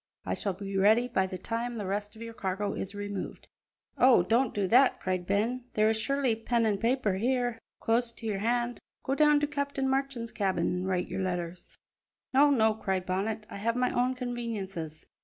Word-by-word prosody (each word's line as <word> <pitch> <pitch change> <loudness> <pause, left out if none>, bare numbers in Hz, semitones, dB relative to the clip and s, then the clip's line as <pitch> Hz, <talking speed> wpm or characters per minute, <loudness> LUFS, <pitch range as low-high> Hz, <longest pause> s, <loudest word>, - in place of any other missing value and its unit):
I - - -1
shall 200 - -2
be 195 +1 -6
ready 220 +5 +5
by 190 -6 +1
the 185 -1 -5
time 230 +5 -3
the 210 - -4
rest 205 +2 -3
of 225 - -9
your 230 0 -7
cargo 200 0 -2
is 195 +1 -4
removed." 205 -1 -5 0.5
"Oh, 250 -8 +6
don't 230 +5 +2
do 205 -2 -1
that!" 250 +5 +5
cried 185 -1 -2
Ben; 230 +5 0
"there 215 0 +4
is 220 0 0
surely 275 -2 +1
pen 230 +1 0
an' 205 -2 +1
paper 230 -2 +1
here, 245 +1 0 0.2
close 230 +1 +1
to 230 - -11
your 210 -3 -1
hand. 240 +2 0 0.2
Go 265 - -1
down 300 +1 +5
to - - +3
Captain 280 -2 -2
Marchand's 265 -4 -1
cabin 195 -3 0
an' 180 +1 -2
write 185 -1 0
your - - -3
letters." 175 -1 -4 0.6
"No, 285 +2 +6
no," 220 -6 +4
cried 190 -4 -2
Bonnet, 210 +4 -2
"I - - -8
have 230 +3 0
my 250 0 +1
own 250 +1 +1
conveniences." 210 - -5
225 Hz, 195 wpm, -29 LUFS, 195-245 Hz, 0.6 s, Oh